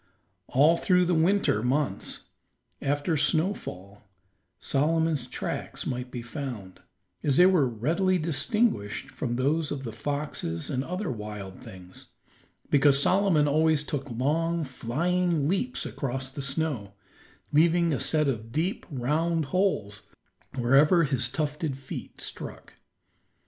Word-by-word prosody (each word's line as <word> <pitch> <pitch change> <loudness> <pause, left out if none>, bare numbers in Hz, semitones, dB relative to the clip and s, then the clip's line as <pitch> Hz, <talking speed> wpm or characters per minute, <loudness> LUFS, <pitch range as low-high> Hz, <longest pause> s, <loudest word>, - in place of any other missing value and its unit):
All 150 +6 +4
through 180 0 +3
the 175 - +1
winter 170 - +2
months, 125 -4 -1 0.5
after 145 +4 0
snowfall, 145 - -1 0.6
Solomon's 155 -1 0
tracks - - -4
might 125 0 -3
be 120 -1 -6
found, 120 -8 -6 0.4
as 140 -2 +1
they 180 - +8
were 175 -9 +4
readily 165 - +1
distinguished 155 - 0
from 125 -2 -3
those 145 +5 +1
of 140 -2 -4
the 115 - -5
foxes 140 - -3
and 130 -1 -1
other 180 +1 -3
wild 105 -4 -7
things 90 -1 -11 0.6
because 140 -1 +5
Solomon 180 -2 +3
always 155 +1 +3
took 140 -2 -4
long, 160 +7 0
flying 155 +5 0
leaps 195 +9 0
across 130 -1 -4
the 140 - -6
snow, 140 -8 -2 0.6
leaving 170 +2 +4
a 135 - -1
set 155 -2 +2
of 115 -4 -3
deep, 165 +8 -2
round 155 +4 0
holes 140 - 0 0.5
wherever 140 +7 +4
his 135 -4 +2
tufted 150 -2 -2
feet 135 0 -8
struck. - - -7
145 Hz, 125 wpm, -27 LUFS, 125-165 Hz, 0.6 s, they